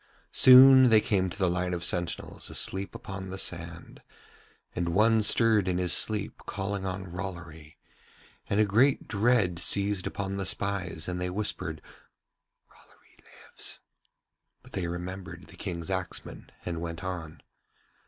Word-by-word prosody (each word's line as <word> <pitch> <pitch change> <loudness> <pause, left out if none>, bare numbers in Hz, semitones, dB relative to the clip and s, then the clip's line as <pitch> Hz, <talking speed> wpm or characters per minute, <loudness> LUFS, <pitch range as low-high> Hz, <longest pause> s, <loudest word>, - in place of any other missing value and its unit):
Soon 130 0 +9
they 110 -1 +6
came 100 -5 0
to 85 - -9
the 95 -2 +1
line 90 0 -1
of 85 - -5
sentinels 85 0 -3
asleep 95 +1 -4
upon 95 -1 -7
the 95 - -6
sand, 85 -2 -3 0.7
and 85 -1 -2
one 110 +2 +4
stirred 110 -2 +4
in 90 -1 0
his 90 -1 +1
sleep 105 -2 -1
calling 95 -1 -3
on 95 +1 -4
Rollory, 85 -4 -8 0.7
and 100 - +1
a 110 - +5
great 120 +8 +2
dread 105 -5 +2
seized 100 +1 0
upon 100 0 -4
the 95 - -3
spies 90 -6 -2
and 90 0 -3
they 90 - -1
whispered 90 -5 -4 0.8
'Rollory - - -25
lives,' - - -8 0.8
but - - -17
they 90 -3 -3
remembered 90 0 -7
the - - -15
King's 85 -1 -5
axeman 95 -1 -5 0.2
and 85 -2 -4
went 85 +1 -6
on. 85 -5 -6
95 Hz, 145 wpm, -28 LUFS, 85-100 Hz, 0.8 s, Soon